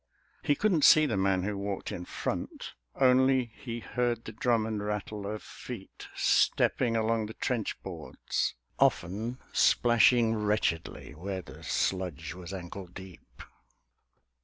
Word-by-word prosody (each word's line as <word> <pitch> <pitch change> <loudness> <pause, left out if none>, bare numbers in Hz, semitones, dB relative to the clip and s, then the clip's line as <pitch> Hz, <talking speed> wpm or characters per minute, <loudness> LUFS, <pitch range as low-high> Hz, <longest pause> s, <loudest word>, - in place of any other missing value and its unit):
He 145 - +2
couldn't 180 -6 +2
see 155 0 +8
the 125 - -1
man 95 -1 +1
who 105 +1 -2
walked 100 0 -4
in 90 - -5
front; - - -4 0.2
Only 130 -1 +4
he 120 -2 -6
heard 120 -1 -1
the - - -6
drum 115 0 +1
and 110 -2 -3
rattle 105 0 -4
of 105 +1 -5
feet - - -9
Stepping 115 -2 +2
along 110 -1 +1
the 110 - -9
trench 120 -5 -2
boards, - - -3 0.2
often 110 +8 +1 0.2
splashing 120 -1 +4
Wretchedly 105 -9 -1
where 95 +4 -5
the - - -12
sludge 85 -5 -2
was 90 0 -9
ankle 95 0 -7
deep. 95 0 -12
105 Hz, 135 wpm, -29 LUFS, 95-120 Hz, 0.2 s, see